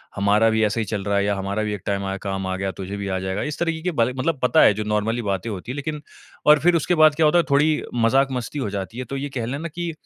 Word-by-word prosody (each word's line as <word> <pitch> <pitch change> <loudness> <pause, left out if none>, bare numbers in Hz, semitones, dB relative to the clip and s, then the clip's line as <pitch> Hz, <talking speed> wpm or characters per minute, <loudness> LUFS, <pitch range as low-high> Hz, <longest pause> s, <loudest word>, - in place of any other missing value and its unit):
हमारा 105 +3 +3
भी 110 0 +1
ऐसे 105 +2 -1
ही - - -2
चल 105 -1 -3
रहा 100 0 0
है 100 - +2
या 100 0 +1
हमारा 100 +2 -2
भी 105 -1 -2
एक 100 - -6
टाइम 100 -1 -1
आया 95 0 -3
काम 95 -1 -3
आ 95 - -2
गया, 95 0 -2
तुझे 95 +2 -6
भी 100 0 -4
आ 95 -1 -1
जाएगा। 95 +2 -3
इस 150 0 -4
तरीके 165 -2 -1
कि 180 - -1
बातें 120 -5 +1
मतलब 155 +1 0
पता 140 +5 +4
है - - +6
जो 105 +2 -3
नॉर्मली 105 +3 -1
बातें 100 0 -2
होती 105 +3 -6
है - - -5
लेकिन 150 +1 -4 0.4
और 150 0 +7
फिर 175 +4 +3
उसके 170 +2 +1
बाद 155 -2 +5
क्या 160 0 +3
होता 150 +3 +4
है 170 - +4
थोड़ी 150 +2 +3
मज़ाक-मस्ती 130 +3 +1
हो 115 - -2
जाती 100 +3 -5
है। 130 - -3
तो 135 +3 -5
ये 145 +1 -4
कह 120 -3 -2
लें 130 +4 -3
ना 165 - -4
कि 170 +1 -4
115 Hz, 305 wpm, -22 LUFS, 100-150 Hz, 0.4 s, और